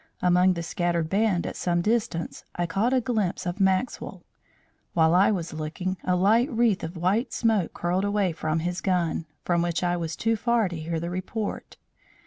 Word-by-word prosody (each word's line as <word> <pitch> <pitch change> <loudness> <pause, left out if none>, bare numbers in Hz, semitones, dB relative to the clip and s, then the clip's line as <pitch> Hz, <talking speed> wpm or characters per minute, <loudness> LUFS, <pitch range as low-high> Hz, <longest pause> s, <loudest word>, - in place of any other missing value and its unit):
Among 180 +1 +4
the 170 -1 -4
scattered 170 -1 -1
band 200 -3 +2
at - - -4
some 175 -1 0
distance, 220 -6 -1
I 175 - 0
caught 200 +8 0
a 260 - +4
glimpse 220 -7 -1
of 175 +3 -3
Maxwell. 190 +5 0 0.7
While 160 -1 +4
I 185 +3 +5
was 175 -7 -2
looking, 160 +4 -3
a 180 - +1
light 220 - +3
wreath 230 -4 +2
of 165 +2 -5
white 195 - +1
smoke 220 -7 +1
curled 180 +2 0
away 205 -2 +1
from 160 0 -2
his 175 +2 -2
gun, 175 -3 0 0.2
from 170 -1 +2
which 170 +1 -1
I 175 0 +1
was 165 -2 -3
too 225 0 +1
far 235 -1 +1
to 175 - -6
hear 165 +1 -3
the 170 +2 -4
report. 190 +4 -4
180 Hz, 185 wpm, -26 LUFS, 170-210 Hz, 0.7 s, I